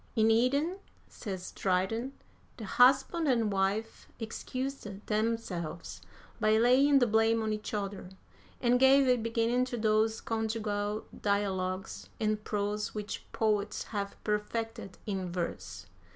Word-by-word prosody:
"In 220 Hz, -1 st, +4 dB
Eden," 280 Hz, -, +2 dB, 0.3 s
says 190 Hz, -5 st, -6 dB
Dryden, 200 Hz, +8 st, -1 dB, 0.4 s
"the 220 Hz, -, -6 dB
husband 270 Hz, -, +4 dB
and 230 Hz, -5 st, +2 dB
wife 195 Hz, +3 st, -1 dB
excused 255 Hz, +3 st, -4 dB, 0.2 s
themselves 210 Hz, -7 st, -2 dB, 0.4 s
by 215 Hz, -1 st, +4 dB
laying 260 Hz, +5 st, +5 dB
the 250 Hz, -, +5 dB
blame 225 Hz, 0 st, +3 dB
on 215 Hz, 0 st, 0 dB
each 215 Hz, 0 st, -5 dB
other, 200 Hz, -3 st, -4 dB, 0.5 s
and 245 Hz, 0 st, +3 dB
gave 270 Hz, +1 st, +6 dB
a 250 Hz, -, +5 dB
beginning 230 Hz, +2 st, +1 dB
to 250 Hz, -1 st, -4 dB
those 220 Hz, 0 st, +2 dB
conjugal 215 Hz, -2 st, -2 dB, 0.2 s
dialogues 190 Hz, -2 st, -1 dB
in 215 Hz, -1 st, +1 dB
prose 210 Hz, 0 st, -3 dB
which 210 Hz, 0 st, -6 dB
poets 210 Hz, -2 st, 0 dB
have 200 Hz, -1 st, -3 dB
perfected 210 Hz, -1 st, -3 dB
in 190 Hz, -4 st, -3 dB
verse." 175 Hz, -, -4 dB
220 Hz, 125 wpm, -31 LUFS, 205-240 Hz, 0.5 s, gave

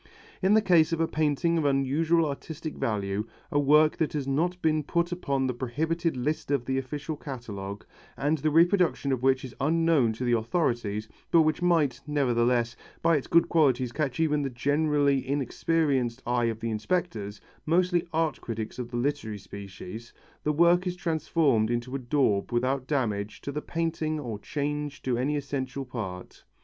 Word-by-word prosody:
In 195 Hz, +2 st, +4 dB
the 220 Hz, -, +4 dB
case 170 Hz, -5 st, +4 dB
of 165 Hz, -, 0 dB
a 165 Hz, -, +2 dB
painting 160 Hz, +2 st, +1 dB
of 155 Hz, -, -1 dB
unusual 145 Hz, +5 st, +2 dB
artistic 155 Hz, +2 st, -5 dB
value, 105 Hz, 0 st, -2 dB, 0.2 s
a 145 Hz, -, +2 dB
work 150 Hz, +2 st, +4 dB
that 160 Hz, -, 0 dB
has 145 Hz, -3 st, -2 dB
not 170 Hz, +6 st, 0 dB
been 155 Hz, -2 st, +2 dB
put 170 Hz, +4 st, -1 dB
upon 140 Hz, -7 st, -1 dB
the 130 Hz, -, 0 dB
prohibited 160 Hz, +6 st, -1 dB
list 145 Hz, +5 st, -2 dB
of 140 Hz, -4 st, 0 dB
the 130 Hz, +1 st, 0 dB
official 150 Hz, +4 st, -5 dB
catalogue, 105 Hz, -9 st, -7 dB, 0.3 s
and 150 Hz, +2 st, +1 dB
the 155 Hz, -, +1 dB
reproduction 170 Hz, -2 st, +3 dB
of 130 Hz, -2 st, 0 dB
which 135 Hz, 0 st, +2 dB
is 130 Hz, -, -9 dB
unknown 160 Hz, -4 st, +3 dB
to 115 Hz, -, -5 dB
the 120 Hz, -, +1 dB
authorities, 115 Hz, -, 0 dB, 0.2 s
but 165 Hz, -1 st, +5 dB
which 155 Hz, +1 st, 0 dB
might, 155 Hz, -8 st, +2 dB
nevertheless, 120 Hz, -4 st, +1 dB, 0.3 s
by 165 Hz, -, +4 dB
its 140 Hz, -, -2 dB
good 170 Hz, 0 st, +4 dB
qualities 130 Hz, -7 st, +2 dB
catch 140 Hz, -1 st, -2 dB
even 150 Hz, -2 st, +2 dB
the 140 Hz, -, -1 dB
generally 145 Hz, +2 st, +2 dB
inexperienced 135 Hz, -2 st, 0 dB
eye 120 Hz, 0 st, +1 dB
of 115 Hz, -1 st, -2 dB
the 115 Hz, 0 st, -2 dB
inspectors 110 Hz, -, -2 dB, 0.3 s
mostly 175 Hz, +1 st, +2 dB
art 160 Hz, -1 st, 0 dB
critics 115 Hz, +1 st, -5 dB
of 120 Hz, -1 st, -4 dB
the 120 Hz, -, -4 dB
literary 120 Hz, -5 st, -2 dB
species 100 Hz, +3 st, -9 dB, 0.3 s
the 150 Hz, -, +1 dB
work 170 Hz, +4 st, +4 dB
is 180 Hz, -, -2 dB
transformed 155 Hz, -9 st, +1 dB
into 120 Hz, +2 st, -2 dB
a -, -, -1 dB
daub 120 Hz, -6 st, +1 dB
without 130 Hz, +2 st, 0 dB
damage 105 Hz, -8 st, -1 dB
to 140 Hz, -, -5 dB
the 150 Hz, +2 st, -3 dB
painting 160 Hz, -2 st, -2 dB
or 115 Hz, -7 st, -5 dB
change 145 Hz, +3 st, -3 dB
to 130 Hz, -2 st, 0 dB
any 145 Hz, +4 st, 0 dB
essential 135 Hz, -1 st, -4 dB
part. 100 Hz, -8 st, -7 dB
140 Hz, 175 wpm, -27 LUFS, 120-160 Hz, 0.3 s, but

